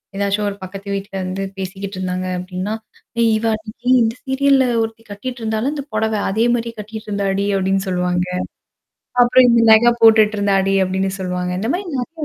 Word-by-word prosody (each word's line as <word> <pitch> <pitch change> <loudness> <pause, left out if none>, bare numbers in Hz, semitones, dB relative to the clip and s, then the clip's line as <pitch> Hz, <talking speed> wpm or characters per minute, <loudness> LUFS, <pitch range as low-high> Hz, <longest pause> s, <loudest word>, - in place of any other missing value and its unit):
ஏதாச்சும் 200 +1 0
ஒரு 200 - -6
பக்கத்து 195 +2 -9
வீட்ல 195 0 -5
இருந்து 185 +1 -3
பேசிக்கிட்டு 190 +1 -6
இருந்தாங்க 185 0 -2
அப்ப்டின்னா, 185 +3 -4 0.5
"ஏய் 230 -1 +4
இவ 225 - -3
அன்னைக்கு 220 +3 -10
இந்த 225 0 +1
சீரியல்ல 270 0 +3 0.2
ஒருத்தி 225 0 -4
கட்டிட்டு 240 +5 -6
இருந்தால்ல 220 +5 -1
இந்த 285 - -4
புடவ 220 0 0 0.2
அதே 220 +4 +1
மாரியே 230 -1 -2
கட்டிட்டு 215 +1 -8
இருந்தாடி" 200 -1 -1
அபப்டின்னு 195 +1 0
சொல்லுவாங்க. 180 -1 0 1.0
அப்புறம் 250 +1 +5
இந்த 235 -1 +4
நக 235 +2 +6
போட்டுட்டு 220 -2 +6
இருந்தாடி 195 -1 +2
அப்டின்னு 190 +1 -1
சொல்லுவாங்க. 180 -1 -2
இந்த 225 +5 -1
மாரி 390 +2 -3
நெறைய 305 +5 -4
210 Hz, 165 wpm, -19 LUFS, 195-230 Hz, 1.0 s, நக